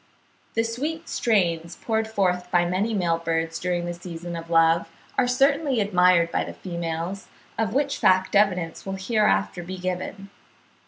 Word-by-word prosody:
The 225 - +2
sweet 295 +9 -3
strains 170 -7 0
poured 220 -1 -1
forth 180 -4 0
by 175 -1 +3
many 185 +6 0
male 175 -5 +1
birds 165 0 -1
during 175 -1 -1
the 175 - -3
season 170 0 -7
of 165 0 -7
love, 165 0 +4 0.3
are 250 - +2
certainly 275 +1 +2
admired 180 -4 +4
by - - 0
the - - -8
females, 170 +1 -4 0.3
of 220 0 -1
which 280 0 0
fact 185 +1 +3
evidence 180 -5 +2
will 195 0 -4
hereafter 210 -3 +1
be 185 +2 -7
given. 185 +2 -4
185 Hz, 155 wpm, -24 LUFS, 170-220 Hz, 0.3 s, love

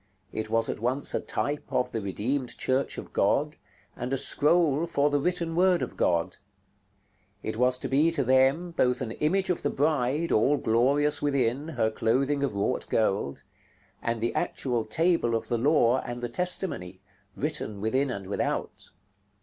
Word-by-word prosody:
It 110 0 -4
was 115 0 +1
at - - -4
once 125 +5 0
a - - +1
type 145 +1 -3
of 125 - 0
the 115 - -3
Redeemed 120 +7 -2
Church 130 +1 -1
of - - -8
God, - - +1 0.4
and 125 +2 -5
a 135 - +1
scroll 150 +3 +3
for 145 -1 +1
the 145 - +2
written 170 +1 -1
word 180 0 +3
of - - -6
God. 85 -1 0 1.1
It 110 - -3
was 125 +2 +2
to - - -4
be 145 +5 +3
to 145 -4 +2
them, 135 +7 +3
both 125 -6 +1
an 115 -4 -3
image 185 +9 0
of 175 - -2
the - - 0
Bride, 150 +2 0
all 135 +7 +3
glorious 140 +7 +2
within, 140 0 0
her 120 -9 0
clothing 130 +6 0
of 135 -7 -1
wrought 100 +6 -1
gold; 100 -10 0 0.6
and 115 0 -2
the 115 +2 -1
actual 120 -4 -1
Table 160 -1 +1
of 115 - -3
the 120 - 0
Law 130 -2 +3
and 120 0 -6
the 120 0 -4
Testimony, 120 - -1 0.4
written 105 -2 -2
within 130 +7 0
and 100 -6 -5
without. 100 - -3
130 Hz, 170 wpm, -27 LUFS, 115-150 Hz, 1.1 s, scroll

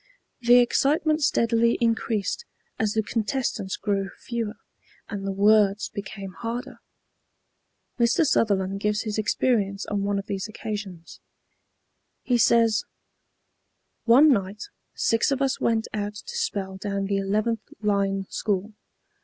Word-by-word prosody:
The 240 0 +6
excitement 305 +5 +2
steadily 235 -4 +2
increased 230 - 0 0.3
as 215 -1 +1
the 220 - +1
contestants 220 -2 -2
grew 195 -1 -1
fewer, 230 -2 -4 0.5
and 195 -2 -4
the - - 0
words 205 +1 +3
became 200 -2 -7
harder. 240 +4 -5 1.2
Mr. 240 +8 +3
Sutherland 195 -7 +1
gives 210 0 0
his 215 -1 -3
experience 210 -2 0
on 205 -1 -2
one 200 0 0
of 195 - -4
these 195 0 -3
occasions. 205 -6 -7 1.0
He 245 -2 +1
says: 230 -1 +4 1.2
"One 270 +5 +7
night 200 0 -3 0.3
six 225 0 +2
of 275 -1 0
us 270 -1 0
went 225 -1 +1
out 205 0 -3
to 475 - -8
spell 200 - -2
down 200 0 -3
the 200 0 0
11th 215 +4 0 0.2
line 195 -2 +1
school. 205 +1 -2
215 Hz, 125 wpm, -25 LUFS, 200-235 Hz, 1.2 s, One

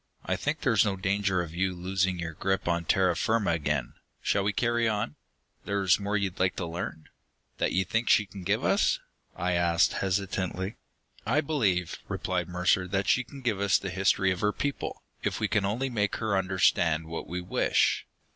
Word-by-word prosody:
"I - - 0
think 145 +1 -2
there's 115 -6 +4
no 100 -3 0
danger 95 -1 0
of 80 -2 -8
you 95 +1 0
losing 95 +1 0
your 85 -1 -4
grip 95 +4 -1
on 85 -1 0
terra 90 -1 +3
firma 110 +2 +1
again. 75 -6 -1 0.3
Shall 100 - +2
we 100 - +1
carry 120 +2 +1
on?" 105 -9 -1 0.5
"There's 100 -3 +2
more 100 +1 0
you'd 100 -3 -2
like 90 0 +2
to 90 - -3
learn? 80 -2 -5 0.5
That - - +1
you 95 +1 +2
think 115 +4 0
she 105 - +5
can 95 0 -10
give 100 +4 0
us?" - - +3 0.4
I 90 +1 -1
asked 85 -1 +3
hesitantly. 95 0 -2 0.5
"I 120 +7 +2
believe," 105 - 0
replied 90 -2 -2
Mercer, 90 +1 +2
"that 100 +1 -1
she 125 - +3
can 140 +2 -12
give 115 -6 0
us 100 -1 +4
the 100 - -5
history 95 0 +2
of 90 - -2
her 105 - +2
people, 140 +5 -4 0.2
if - - -2
we - - +1
can 105 -2 +1
only 115 +7 -1
make 105 -3 0
her 110 -3 -1
understand 90 -4 +2
what 80 +1 -6
we 90 +1 -3
wish. 90 - +1
95 Hz, 190 wpm, -28 LUFS, 90-105 Hz, 0.5 s, she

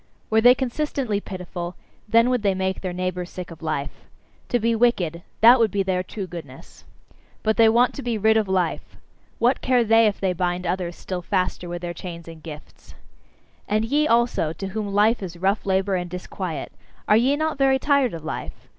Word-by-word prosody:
Were 220 0 +4
they 245 +2 +7
consistently 260 -4 -2
pitiful, 180 -2 -6 0.3
then 230 +3 +4
would 250 -2 +1
they 200 -2 +1
make 190 0 -2
their 185 - -3
neighbours 180 0 -3
sick 180 -1 -8
of 165 - -12
life. 150 -3 -4 0.4
To 245 - +2
be 230 +1 +1
wicked 195 -8 +1 0.2
that 240 +3 +8
would 225 -2 +4
be 200 0 0
their 185 -1 0
true 190 +2 -6
goodness. 165 -3 -11 0.6
But 220 0 +2
they 225 -1 +6
want 240 +3 +3
to - - -6
be 240 -3 -2
rid 220 +1 +3
of 220 -2 +2
life; 185 -3 -2 0.4
what 245 +3 +2
care 250 -2 +3
they 225 0 +5
if 205 - -1
they 190 -2 0
bind 180 0 -2
others 175 0 -2
still 185 -1 -5
faster 180 -1 -2
with 175 0 -6
their 175 0 -3
chains 170 -1 -8
and 165 -1 -11
gifts! 150 -2 -12 0.7
And 215 +1 +1
ye 295 +6 +2
also, 235 - +2
to 190 +4 -6
whom 205 0 -4
life 210 +3 +3
is 175 -3 -6
rough 195 +4 0
labour 190 +1 +1
and 175 -1 -4
disquiet, 180 -2 -5 0.4
are 210 - +5
ye 255 +6 +3
not 310 -1 -2
very 270 -1 +4
tired 275 - +2
of 160 - -8
life? 160 - -6
195 Hz, 200 wpm, -23 LUFS, 175-230 Hz, 0.7 s, that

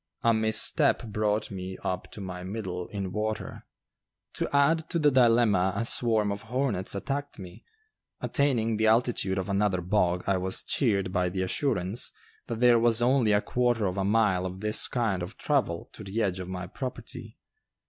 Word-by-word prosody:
A 115 - +4
misstep 110 0 +2
brought 105 0 -1
me 95 -1 -6
up 90 -1 -3
to 105 - -8
my 90 -1 -6
middle 95 -3 -5
in 100 -3 -5
water. 110 +1 -4 0.7
To - - -3
add 155 +3 +2
to - - 0
the 150 -3 +3
dilemma 115 -7 +4
a 115 +3 -1
swarm 110 -4 +3
of 100 0 -4
hornets 120 -6 -2
attacked 145 +7 -4
me. 90 -2 -11 0.6
Attaining 115 -6 0
the 110 0 +2
altitude 110 -4 +2
of 95 - -2
another 100 -1 +1
bog 90 -1 +1
I 100 -1 +1
was 95 +1 -1
cheered 100 -8 0
by 90 -1 +1
the 95 +1 -2
assurance 100 -1 -1 0.4
that 115 0 -4
there 120 -1 +6
was 115 0 +3
only 125 -3 +3
a 105 0 +3
quarter 120 -3 0
of 90 0 -2
a 95 - 0
mile 100 -3 +2
of 95 +1 -8
this 105 0 +2
kind 110 -7 -1
of 90 +5 -6
travel 125 - -1
to 110 - -10
the 105 +3 -2
edge 95 -2 -1
of 90 0 -6
my 90 0 -5
property. 125 +8 -7
105 Hz, 180 wpm, -27 LUFS, 95-120 Hz, 0.7 s, there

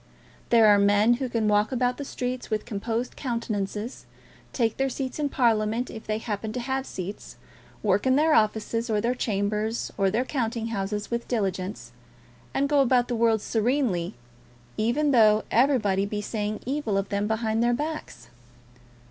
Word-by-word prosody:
There 230 -2 +6
are 205 -1 +6
men 205 +4 +4
who 260 - -1
can 230 -2 0
walk 210 +2 +2
about 250 -1 0
the 285 - -5
streets 250 -1 -4
with 215 -1 -1
composed 230 +2 -3
countenances, 220 -3 -4 0.4
take 230 -3 0
their 270 0 +1
seats 260 +1 -4
in 290 -1 0
Parliament 230 -2 +1
if 220 - -9
they 215 0 0
happen 215 -1 -4
to 250 - -3
have 265 +2 -2
seats, 190 +2 -7 0.5
work 205 +3 +2
in 260 - +4
their 310 +2 +4
offices, 225 0 +1
or 215 -1 +1
their 235 +4 +1
chambers, 215 -1 -2
or 195 -1 +3
their 230 +6 0
counting 230 -4 -2
houses 205 0 -3
with 235 0 -2
diligence, 195 -3 -2 0.6
and 280 - +1
go 290 -1 +4
about 245 -2 +3
the 245 - 0
world 225 -2 +2
serenely, 225 - 0 0.6
even 265 +7 +1
though 215 -4 +5
everybody 215 -6 +3
be 210 0 -3
saying 210 0 -3
evil 260 -6 -1
of 195 0 -2
them 200 0 -1
behind 220 0 0
their 240 +1 +3
backs. 305 +4 -5
225 Hz, 165 wpm, -26 LUFS, 210-250 Hz, 0.6 s, There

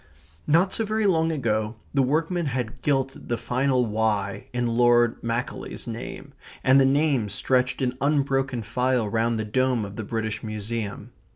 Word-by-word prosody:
Not 170 +5 +3
so 225 - 0
very 215 0 0
long 165 -4 +3
ago 110 -6 -1 0.2
the 140 - +3
workmen 160 +5 0
had 125 -1 -3
gilt 135 -2 0
the 120 - -1
final 125 +2 +1
"y" 105 -2 -1
in 120 0 -1
Lord 120 0 +3
Macaulay's 115 +2 -3
name, 125 +4 -7 0.3
and 135 +1 +6
the - - +5
names 135 -6 +1
stretched 130 +1 +1
in 125 -1 0
unbroken 135 -4 +1
file 125 +1 0
round 115 +2 0
the 110 - -2
dome 125 0 +1
of 100 0 -9
the 110 - -3
British 110 0 -3
Museum. 110 0 -5
125 Hz, 160 wpm, -25 LUFS, 115-135 Hz, 0.3 s, and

